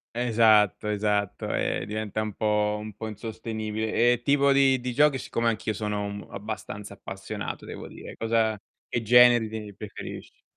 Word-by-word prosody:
Esatto, 110 -4 +4
esatto, 105 -1 -1
e 95 - -1
diventa 110 0 -3
un 110 -1 -3
po' 105 0 +1
un 105 -1 -7
po' 110 +1 -5
insostenibile. 110 +1 -1
E 120 - -3
tipo 140 0 +4
di 135 -1 +4
di 125 0 -4
giochi, 145 0 +4
siccome 115 -1 -1
anch'io 110 0 -2
sono 105 0 -2
um 100 0 -6
abbastanza 105 0 -6
appassionato 95 +2 -6
devo - - -8
dire, - - -10
cosa 115 -1 +1 0.3
che 120 - -2
generi 120 0 +6
te 105 -2 -7
preferisci? 105 0 -9
110 Hz, 155 wpm, -26 LUFS, 105-115 Hz, 0.3 s, generi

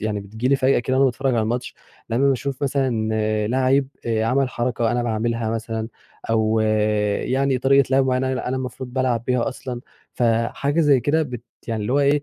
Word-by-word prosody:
يعني 105 -1 -2
بتيجي 110 +5 -3
لي 140 - +4
فجأة 130 0 +3
كده 130 +2 -1
وأنا 135 - +4
باتفرج 130 0 +1
على 115 - +2
الماتش، 120 +3 -3 0.4
لمّا 135 +5 +2
باشوف 135 +1 -2
مثلًا 130 -6 0 0.4
لعّيب 130 +3 +2 0.2
آآ 110 -1 +1
عَمَل 130 +3 +1
حركة 120 -2 -1
أنا 120 0 0
باعملها 115 0 -1
مثلًا، 110 0 -3 0.4
أو 110 0 +2 0.6
يعني 135 0 0
طريقة 135 +1 +4
لعب 135 0 +3
معيّنة 130 +1 0
أنا 125 -1 -3
أنا 130 - -1
المفروض 130 0 -6
بالعب 125 -3 0
بيها 125 0 +1
أصلًا، 125 -2 -6 0.3
فحاجة 120 +6 0
زي 145 -4 +4
كده 155 +5 +1
بت 125 -5 -6 0.3
يعني 110 -2 -2
اللي 120 - -2
هو 145 - +3
إيه 145 +1 +3
125 Hz, 185 wpm, -22 LUFS, 115-135 Hz, 0.6 s, لي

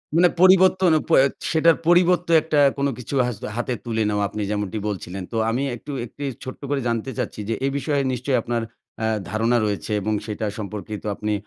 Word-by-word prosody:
মানে 175 +1 +6
পরিবর্তন 185 -2 +6 0.2
প - - -3
এ - - +5 0.3
সেটার 165 0 +4
পরিবর্তে 175 0 +4
একটা 155 -2 0 0.2
কোনো 140 0 +1
কিছু 125 +3 -6
হা 125 - -1 0.3
হাতে 120 +1 -1
তুলে 110 -2 0
নেওয়া 105 0 0
আপনি 105 +1 -5
যেমনটি 105 0 -2
বলছিলেন। 95 -1 -5
তো 115 - -2
আমি 125 +4 0
একটু 145 +5 -9
একটি 145 +5 -10 0.2
ছোট্ট 130 - -8
করে 140 -2 0
জানতে 115 +2 -1
চাচ্ছি 120 -3 -4
যে - - +1
এই 135 - +1
বিষয়ে 140 +1 0
নিশ্চয়ই 130 +1 0
আপনার 120 0 -2 0.4
আ - - +2 0.2
ধারণা 115 +3 +1
রয়েছে 105 +1 -3
এবং 110 +2 -1
সেটা 110 0 -3
সম্পর্কে 105 0 -6
তো - - -5
আপনি 105 +1 -2
120 Hz, 195 wpm, -23 LUFS, 110-150 Hz, 0.4 s, মানে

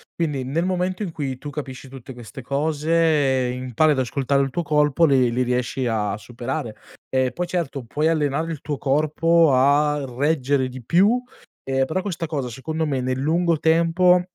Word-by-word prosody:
Quindi, 150 -6 -1
nel 145 +7 -1
momento 185 +1 -1
in 190 -5 -3
cui 135 -5 -4
tu 145 - -7
capisci 135 -2 -7
tutte 130 0 -10
queste 120 +1 -10
cose, 150 -2 +1
impari 130 +4 +1
ad 130 - -2
ascoltare 140 +2 0
il 135 - -3
tuo 175 - -1
corpo, 150 +1 +2
le 130 -4 +3
le 125 +2 -1
riesci 125 +1 -1
a 105 -3 -1
superare. 120 0 -5 0.3
E 130 -1 +1
poi 175 +6 -3
certo, 165 -7 -3
puoi 150 +7 0
allenare 155 +1 0
il 155 -4 -6
tuo 145 -2 -4
corpo 155 +4 +2
a 145 +2 +3
reggere 140 -2 +1
di 130 -1 -9
più, 195 - +3 0.4
ehm, 135 0 0
però 185 +6 -2
questa 175 -5 -3
cosa 140 -5 -3
secondo 155 +6 -3
me, 135 -3 -1
nel 130 0 -1
lungo 165 +4 +1
tempo, 170 +3 +3
145 Hz, 175 wpm, -22 LUFS, 130-165 Hz, 0.4 s, le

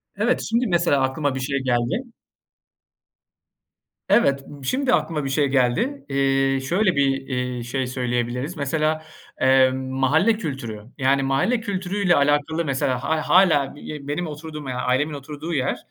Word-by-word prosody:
Evet, 225 +5 +1
şimdi 235 +2 +1
mesela, 170 -6 +2
aklıma 135 +1 0
bir - - -3
şey 140 +1 -1
geldi. 125 - -1 2.0
Evet, 140 -11 +3
b 145 -2 -12
şimdi 260 - 0
aklıma 150 -3 0
bir - - -2
şey 140 +1 +2
geldi. 140 - 0
Eee, 135 0 +2
şöyle 180 +7 +1
bir, 140 0 +3 0.2
iii, 125 -2 -3
şey 130 +2 -2
söyleyebiliriz, 125 +4 -2
mesela, 155 +2 0 0.4
emm, 130 0 +3
mahalle 150 - +3
kültürü. 125 - -5 0.2
Yani, 135 0 +2
mahalle 135 - +1
kültürüyle 195 -3 0
alakalı 145 +3 +1
mesela 130 -2 -1
hâ 155 +1 -1
hâlâ 160 -8 +4
be 145 -1 -8
benim 165 +4 -2
oturduğum, 150 -1 -7
yani 125 0 -3
ailemin 140 +5 0
oturduğu 150 +4 -6
yer 135 -3 0
140 Hz, 145 wpm, -23 LUFS, 130-160 Hz, 2.0 s, hâlâ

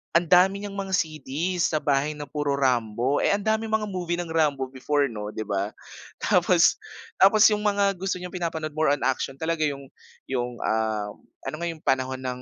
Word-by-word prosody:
ang 170 - +5
dami 190 +2 +5
niyang 200 -1 -6
mga 195 -1 -1
CD's 160 +2 -1
sa 155 -2 -1
bahay 145 +1 +1
na 150 - -6
puro 145 0 -2
Rambo, 125 0 +1
eh, - - +2
ang 205 - -4
daming 220 +1 0
mga 220 -1 +1
movie 175 -2 -2
ng 175 -1 -5
Rambo 145 -5 +1
before 140 +1 0
'no, 105 -1 -6
'di 110 - -3
ba? 100 0 -3 0.5
Tapos - - +4 0.4
tapos 205 +2 +6
yung 210 - +1
mga 200 -1 +2
gusto 195 +1 -1
niyang 180 0 -7
pinapanood 165 -4 -3
more 155 +1 0
on 145 - -8
action 130 +1 -1
talaga 160 +2 -1
yung 140 -2 -6 0.4
yung, 125 -2 -2
ah, 110 -2 -1 0.3
ano 135 - -4
nga 170 - -2
yung 165 -2 -6
panahon 130 0 0
ng 125 0 -4
150 Hz, 195 wpm, -25 LUFS, 130-180 Hz, 0.5 s, tapos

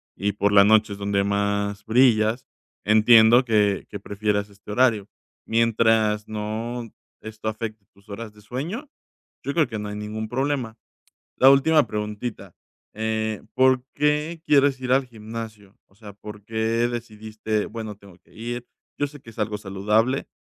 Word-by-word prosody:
y 100 +1 -1
por 100 0 +1
la 100 -1 +7
noche 110 0 +4
es 100 - -9
donde 100 0 0
más 100 0 -1
brillas, 115 -1 +3 0.4
entiendo 110 +3 +6
que 105 -4 +2
que 105 - -7
prefieras 100 +1 -2
este 100 +1 -12
horario, 110 -3 +2 0.4
mientras, 110 -2 +2
no, 110 +3 -4 0.3
esto 110 0 -5
afecte 110 -1 -6
tus 100 +2 -25
horas 105 +1 -7
de 105 - -18
sueño, 160 - -5 0.6
yo 140 - -2
creo 160 -3 +3
que 110 -3 -5
no 105 0 -5
hay 105 - -5
ningún 105 +1 -5
problema. 130 -2 -2 0.6
La 130 - +7
última 145 +3 +5
preguntita, 105 -2 -5 0.4
eh, 110 0 -2
¿por 130 -1 +3
qué 150 +3 0
quieres 140 -2 +4
ir 125 0 +1
al 135 0 +3
gimnasio? 110 -3 -9
O 95 - -29
sea, 105 -1 -12
¿por 105 +1 -11
qué 115 +1 0
decidiste: 110 -2 -4
"Bueno, 110 -2 -6
tengo 100 -3 -17
que - - -26
ir"? 120 +2 -5 0.3
Yo 145 - +1
sé 145 +1 -13
que 115 - -13
es - - -15
algo 105 0 -1
saludable, 105 +6 0
110 Hz, 160 wpm, -24 LUFS, 105-120 Hz, 0.6 s, la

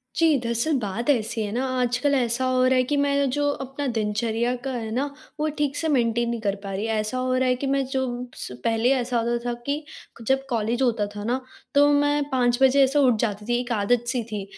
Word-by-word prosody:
जी 320 -3 +4
दरअसल, 235 +6 0
बात 225 +4 -3
ऐसी 230 -4 +1
है 205 - -4
ना, 250 +4 -1
आजकल 250 +3 +1
ऐसा 245 0 +1
हो 255 0 +2
रहा 260 - +4
है 255 - +4
कि 290 +4 -1
मैं 280 -1 +2
जो 290 +3 0
अपना 270 +2 -5
दिनचर्या 225 +3 0
का 270 - -3
है 225 -3 -4
ना 255 +5 0 0.3
वो 305 - +1
ठीक 290 -1 0
से 320 - -1
मेंटेन 235 -4 +1
नहीं 235 -1 -2
कर 200 -2 0
पा 195 - -5
रही। 200 +3 -2
ऐसा 220 +2 -1
हो 255 0 0
रहा 255 0 +2
है 250 - +3
कि 275 +2 -4
मैं 275 0 +1
जो 265 0 -1 0.3
स 125 - -7
पहले 225 +2 +2
ऐसा 250 -1 -1
होता 235 +1 0
था 240 - -1
कि 290 +2 -2 0.4
जब 270 0 +2
कॉलेज 235 +1 -1
होता 230 -5 +2
था 205 - -5
ना 245 +4 0 0.4
तो 285 0 +6
मैं 290 0 +2
5 245 -2 +2
बजे 270 +1 +6
ऐसे 270 +2 +2
उठ 255 -4 +4
जाती 210 -2 -2
थी 240 +1 +1
एक 245 0 -5
आदत-सी 240 +3 +1
थी। 210 -2 -3
245 Hz, 230 wpm, -24 LUFS, 230-270 Hz, 0.4 s, तो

